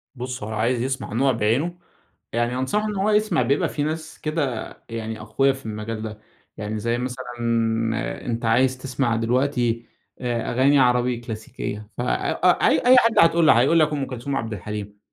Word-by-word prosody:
بُصّ 125 -1 -5
هو 105 - -5
لو 110 - -4
عايز 115 +3 +1
يسمع 130 -3 -3
نوع 135 +4 +3
بعينه 125 +10 0 0.6
يعني 120 +1 0
أنصحه 205 +12 0
إن 210 - -3
هو 195 +2 +1
يسمع، 210 -5 +2
بيبقى 140 +2 +1
في 145 - -2
ناس 155 +1 -4
كده 145 -7 -2 0.2
يعني 110 -1 -5
أقويا 135 +6 +2
في 135 -2 -12
المجال 110 0 -5
ده، 110 -1 -6 0.4
يعني 105 0 -4
زي 115 +2 0
مثلًا 125 +1 -4 1.0
أنت 115 -1 -2
عايز 130 +3 +3
تسمع 130 -2 -1
دلوقتي 120 0 0 0.4
آآ، 120 -2 -2
أغاني 135 +3 +4
عربي 125 -1 +3
كلاسيكية، 110 -2 -6
فأ - - 0 0.2
أ - - +2 0.2
أي 255 +1 +8
حد 230 -2 +4
هتقول 165 0 +5
له - - +8
هيقول 135 +8 +4
لك 155 -1 +3
أم 140 -2 -1
كلثوم 130 +2 -5
وعبد 115 -4 -2
الحليم، 105 +1 -6
125 Hz, 175 wpm, -23 LUFS, 115-140 Hz, 1.0 s, أي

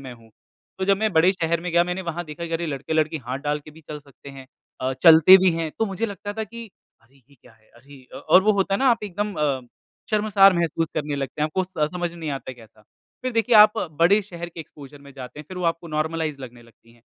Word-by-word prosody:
मैं 130 -2 -9
हूँ। 115 -1 -20 0.5
तो 190 - -1
जब 195 +1 +3
मैं 215 0 -1
बड़े 170 +3 +4
शहर 170 -3 -1
में 180 +1 -5
गया 170 0 +4
मैंने 180 +2 -4
वहाँ 175 0 -5
देखा 155 +2 -7
कि 165 - -8
अरे! 165 +1 -2
लड़के-लड़की 155 +2 -1
हाथ 130 +2 -3
डाल 145 +1 -2
के 150 - -14
भी 155 +2 -17
चल 150 - -6
सकते 140 -1 -16
हैं, 135 -1 -12 0.3
अ, 130 +1 -1
चलते 165 +2 +9
भी 185 0 +3
हैं। 165 -1 -3
तो 225 - +1
मुझे 195 +4 -3
लगता 205 0 -7
था 220 +1 -4
कि 230 +2 -10 0.4
अरे! 130 +3 -28
ये 140 +1 -26
क्या 120 - -19
है? 110 -1 -29
अरे! 135 +2 -16
अ, - - -7
और 185 - +4
वो 215 +2 +3
होता 195 -1 0
है - - 0
ना 270 - +1
आप 230 -2 0
एकदम 205 +1 -4
अ, 145 -3 -1 0.5
शर्मसार 205 -2 +4
महसूस 165 -1 -1
करने 150 -2 -3
लगते 140 +1 -5
हैं। - - +2
आपको 185 +5 -2
स 155 -5 -3
समझ 175 -1 -3
में 170 - -13
नहीं 160 -2 -5
आता 135 -1 -6
है - - -10
कैसा। 110 -2 -19 0.4
फ़िर 255 0 -3
देखिए 230 +1 +1
आप 210 +1 +7 0.2
बड़े 195 +5 +5
शहर 175 -3 -8
के 170 -1 -10
एक्सपोज़र 145 -2 -13
में 140 -1 -14
जाते 130 +2 -10
हैं, - - -12
फ़िर 185 - -8
वो 180 - -4
आपको 165 0 -14
नॉर्मलाइज़ 155 -2 -2
लगने 120 -2 -11
लगती 115 0 -23
हैं। 120 -1 -26
165 Hz, 260 wpm, -23 LUFS, 140-190 Hz, 0.5 s, चलते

